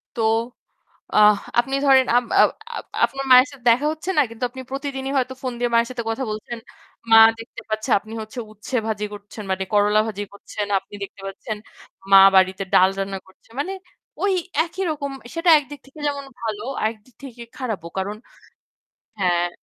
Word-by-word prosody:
তো 230 - -2 0.9
আহ 210 0 +7 0.2
আপনি 270 +3 0
ধরেন 265 -2 +6
আম 245 0 +3
আও - - +8 0.3
আপ - - -5 0.2
আপনার 275 0 -6
মায়ের 255 +1 +8
সাথে 270 -4 -15
দেখা 245 +5 +3
হচ্ছে 315 +4 -8
না - - +7
কিন্তু 230 +2 -9
আপনি 260 +2 -9
প্রতিদিনই 270 -1 -4
হয়তো 260 0 0
ফোন 255 -2 -3
দিয়ে 245 0 +1
মায়ের 235 +1 +3
সাথে 240 -2 -4
কথা 225 +4 -2
বলছেন। 215 +2 -6 0.5
মা 225 - +9 0.2
দেখতে 225 - -10
পাচ্ছে 215 0 -3
আপনি 215 +2 -12
হচ্ছে 220 +3 -8
উচ্ছে 215 +5 -7
ভাজি 210 -1 -2
করছেন 205 +1 -9
মানে 190 0 -1
করলা 210 +1 +4
ভাজি 205 -2 -4
করছেন। 205 +1 -5
আপনি 195 - -8
দেখতে 195 - -10
পাচ্ছেন 210 +2 -6 0.5
মা 195 - +10 0.2
বাড়িতে 190 +1 +3
ডাল 185 +1 +6
রান্না 195 0 -3
করছে। 190 - -24
মানে 370 +7 -2 0.5
ওই 400 -1 +2 0.3
একই 350 +3 -5
রকম 280 -2 -4 0.2
সেটা 330 +1 +1
একদিক 290 0 -10
থেকে 275 +3 -15
যেমন 280 -1 -3 0.2
ভালো 215 -2 -3 0.2
আর - - +3
একদিক 225 +1 -19
থেকে 245 -3 -10 0.2
খারাপও 215 -10 -4
কারণ 195 +2 -2 1.1
হ্যাঁ। 175 -2 +2
230 Hz, 175 wpm, -22 LUFS, 205-270 Hz, 1.1 s, মা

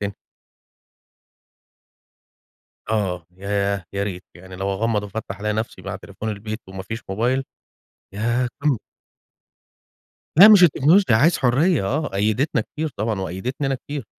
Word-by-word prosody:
تاني. 100 -1 -3 2.8
آه 95 -6 -1
ياه! 100 -1 -1
يا 100 0 -1
ريت 95 -2 -5
يعني 95 +1 -11
لو 95 +1 -2
أغمض 105 +1 0
وافتح 100 -1 -6
الاقي 105 0 -1
نفسي 110 -3 -4
مع 95 +1 -5
تليفون 100 +2 -7
البيت 110 +1 -5
ومافيش 95 +4 -6
موبايل 120 +7 0 0.7
ياه 120 +4 0
كنت 140 -7 +1 1.6
لأ 200 - +12
مش 210 -4 +8
التكنولوجيا 165 - +5
عايز 155 +9 +4
حُرية 135 - +2
آه 145 +9 -1
قيدتنا 110 +7 0
كتير 155 +7 -4
طبعًا 110 -1 -1
وقيدتني 120 +10 -3
أنا 135 - 0
كتير. 145 -1 -7
110 Hz, 125 wpm, -22 LUFS, 100-130 Hz, 2.8 s, لأ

